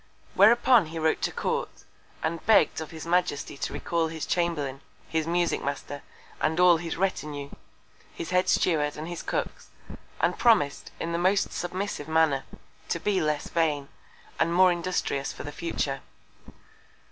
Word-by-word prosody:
Whereupon 230 0 +6
he 165 +1 -7
wrote 160 0 +1
to - - 0
Court, - - -3 0.4
and 165 +1 -2
begg'd 220 -6 +4
of 160 - -6
his 160 -1 -8
Majesty 175 -5 0
to - - -3
recal 170 -1 -1
his 160 -1 -5
Chamberlain, 150 -6 -1 0.3
his 160 0 -1
Musick 175 0 0
Master, 140 0 -4 0.4
and 160 +2 +1
all 180 -2 +7
his 165 0 -5
Retinue, 150 -6 -2 0.6
his 165 - -7
Head 180 0 +2
Steward 150 -4 +2
and 155 +2 -5
his 175 -1 -5
Cooks, - - -4 0.5
and - - +1
promis'd, 215 -13 +3
in 165 - -3
the 170 - -1
most 190 +3 +2
submissive 180 -3 -4
Manner, 160 -4 +2 0.4
to 170 - -1
be 200 +1 +1
less 150 -1 -1
vain, 150 -4 0 0.5
and 170 - +2
more 185 0 +6
industrious 170 -5 -2
for - - -8
the 145 - -6
future. 145 -4 -3
165 Hz, 155 wpm, -27 LUFS, 150-180 Hz, 0.6 s, all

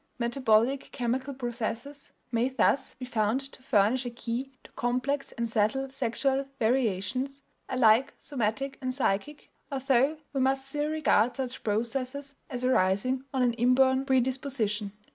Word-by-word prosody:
Metabolic 240 +1 +2
chemical 260 +2 -2
processes 245 +3 -5 0.2
may 235 +2 +2
thus 260 +1 +1
be 255 - -7
found 220 0 +1
to 270 -1 -11
furnish 245 0 +2
a 245 - -3
key 240 +3 -4
to - - -16
complex 255 +4 -1
and 235 0 -2
subtle 230 +5 0
sexual 270 +1 0
variations, 255 +3 0 0.3
alike 255 +1 +4
somatic 270 +1 -2
and 255 -1 -2
psychic, 270 +4 -1 0.2
although 270 +2 +2 0.2
we 270 - 0
must 265 +1 +1
still 295 +2 -1
regard 280 -7 +2
such 260 -2 -5
processes 255 +6 -2 0.2
as 250 -1 -3
arising 255 +3 +2
on 265 -2 +1
an 240 -1 +3
inborn 260 +2 +3
predisposition. 255 -6 0
255 Hz, 135 wpm, -28 LUFS, 230-270 Hz, 0.3 s, alike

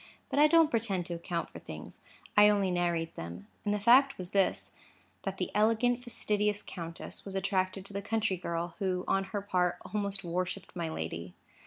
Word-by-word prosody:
But - - +2
I 300 - +8
don't 325 -1 +5
pretend 205 -6 0
to 175 - -3
account 170 0 -3
for - - -9
things: - - -9 0.3
I 210 0 +8
only 200 -3 +2
narrate 170 -2 0
them. 85 +3 -7 0.2
And 205 - 0
the 210 - +2
fact 260 +6 +6
was 180 -1 -7
this:—that 195 -1 -2
the - - -2
elegant, 230 +3 +3
fastidious 210 -3 0
countess 170 -2 -7
was 195 -1 -6
attracted 190 0 0
to 200 - -7
the 200 - -2
country 220 -2 0
girl, 170 0 -3
who 185 -2 0
on 195 0 +2
her 200 +1 -4
part 180 -3 +1 0.2
almost 200 -2 -1
worshipped 180 +2 -3
my 170 -2 -2
lady. 85 - -5
195 Hz, 180 wpm, -31 LUFS, 175-210 Hz, 0.3 s, I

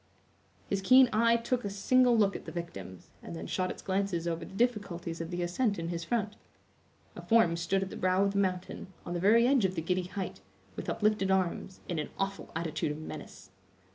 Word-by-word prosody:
His 195 -1 -1
keen 255 +4 +6
eye 230 +2 +4
took 240 +2 -1
a 200 - -2
single 245 +5 +3
look 200 -2 +3
at - - -7
the - - -6
victims, 100 - -8
and 85 - -8
then 80 0 -6
shot 185 - -1
its - - -7
glances 190 -3 -1
over 165 0 -2
the 190 - -10
difficulties 195 -8 -1
of 165 - -5
the 175 0 -2
ascent 200 +5 0
in 165 0 -3
his 170 -1 -3
front. 215 +2 -2 0.8
A - - -7
form 225 -7 +4
stood 190 +3 0
at 190 - -6
the - - -6
brow 185 +1 +2
of 200 - +2
the 200 - 0
mountain, 185 -2 -2 0.2
on 175 - -4
the 175 - -1
very 220 +6 +5
edge 260 -2 +4
of 190 -1 +1
the 165 - -1
giddy 180 +2 0
height, 190 -1 -5 0.4
with - - -5
uplifted 210 -3 +1
arms, 190 0 -1
in 170 -3 -2
an 150 - -3
awful 195 0 -3
attitude 160 -2 -2
of 150 - -5
menace. 145 -11 -9
190 Hz, 215 wpm, -30 LUFS, 170-210 Hz, 0.8 s, keen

